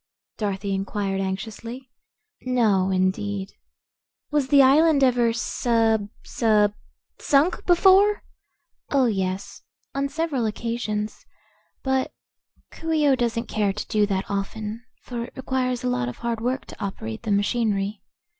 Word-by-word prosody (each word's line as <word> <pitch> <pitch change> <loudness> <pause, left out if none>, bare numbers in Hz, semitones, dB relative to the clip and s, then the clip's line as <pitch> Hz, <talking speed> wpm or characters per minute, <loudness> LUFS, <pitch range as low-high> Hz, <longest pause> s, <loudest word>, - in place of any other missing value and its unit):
Dorothy 200 -1 -2
inquired 195 0 -2
anxiously. 220 +6 -5 0.5
"No, 220 -7 +2
indeed." 190 +1 -1 0.8
"Was 295 -3 +1
the 275 0 +6
island 290 +2 +5
ever 245 -3 +3
sub 225 -2 +1
sub 210 -3 +2 0.5
sunk 295 +6 +2
before?" 385 +3 +5 0.7
"Oh, 275 -2 +3
yes; 195 -2 -2 0.3
on 275 0 -1
several 285 -6 -1
occasions. 215 -1 -3 0.6
But 265 -1 0 0.6
Coo 325 0 -5
ee 305 -2 +3
oh 270 - +5
doesn't 235 -1 -1
care 205 -2 0
to 210 - -5
do 210 -2 +2
that 195 -1 -1
often, 210 +3 -4 0.2
for 235 -2 -4
it - - -14
requires 255 -1 -1
a - - 0
lot 125 - 0
of 125 - -8
hard 235 -1 -3
work 255 +3 -1
to - - -9
operate 110 - -5
the - - -5
machinery. 205 -1 0
230 Hz, 130 wpm, -24 LUFS, 200-260 Hz, 0.8 s, the